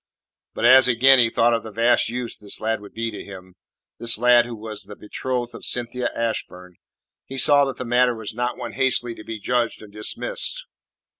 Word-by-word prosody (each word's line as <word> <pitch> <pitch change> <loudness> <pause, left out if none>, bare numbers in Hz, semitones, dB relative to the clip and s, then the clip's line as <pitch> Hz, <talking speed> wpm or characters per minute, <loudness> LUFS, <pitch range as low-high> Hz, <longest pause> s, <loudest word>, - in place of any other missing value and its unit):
But - - -1
as 130 +2 +7
again 130 +2 +5
he 115 -2 +4
thought 115 +1 +2
of 115 - 0
the 110 - -9
vast 115 +2 +2
use 120 0 -3
this 105 - -4
lad 110 -1 -2
would 100 - -14
be 115 0 -3
to 105 - -8
him 95 -2 -12 0.5
this 115 -1 +2
lad 120 0 +4
who 120 - -7
was 105 -1 -5
the 105 +1 -10
betrothed 120 +3 -4
of - - -11
Cynthia 120 0 -2
Ashburn 90 -6 -4 0.5
he 135 - -7
saw 145 +1 +5
that 135 - -4
the 130 - -5
matter 120 0 +2
was 110 -2 -6
not 120 +2 -3
one 120 -2 -6
hastily 125 -3 +1
to 110 - -12
be 115 0 -6
judged 120 0 -1
and 105 -1 -14
dismissed. - - -2
120 Hz, 205 wpm, -22 LUFS, 110-125 Hz, 0.5 s, as